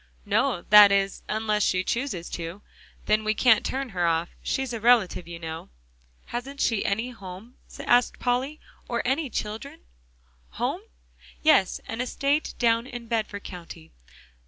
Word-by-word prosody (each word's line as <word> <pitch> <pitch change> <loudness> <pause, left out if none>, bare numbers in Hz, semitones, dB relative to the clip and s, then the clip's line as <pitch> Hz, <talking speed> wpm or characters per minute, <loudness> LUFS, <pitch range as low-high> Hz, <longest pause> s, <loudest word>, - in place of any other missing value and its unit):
"No; 175 - +1
that 210 -1 +10
is, 195 0 +1
unless 215 -1 0
she 185 -2 +2
chooses 235 -7 -2
to, 170 +4 -6 0.4
then 215 0 +2
we 215 0 0
can't 230 -2 +5
turn 270 0 -3
her 180 -4 0
off. 165 +1 +1
She's 265 -2 -2
a 230 - -3
relative, 220 -7 +3
you 170 -1 -7
know." 160 -1 -7 0.6
"Hasn't 270 +4 -6
she 225 -7 +1
any 225 +5 -1
home?" 200 +2 -11 0.2
asked 245 0 +3
Polly, 260 +5 -1 0.3
"or 235 -1 -1
any 270 +3 0
children?" 220 +5 -5 0.8
"Home? - - -1 0.6
Yes, 190 - +4
an 225 +2 -3
estate 280 +4 -1
down 230 0 +2
in 240 -2 -7
Bedford 220 -3 -2
County? 170 - -10
220 Hz, 145 wpm, -26 LUFS, 190-245 Hz, 0.8 s, that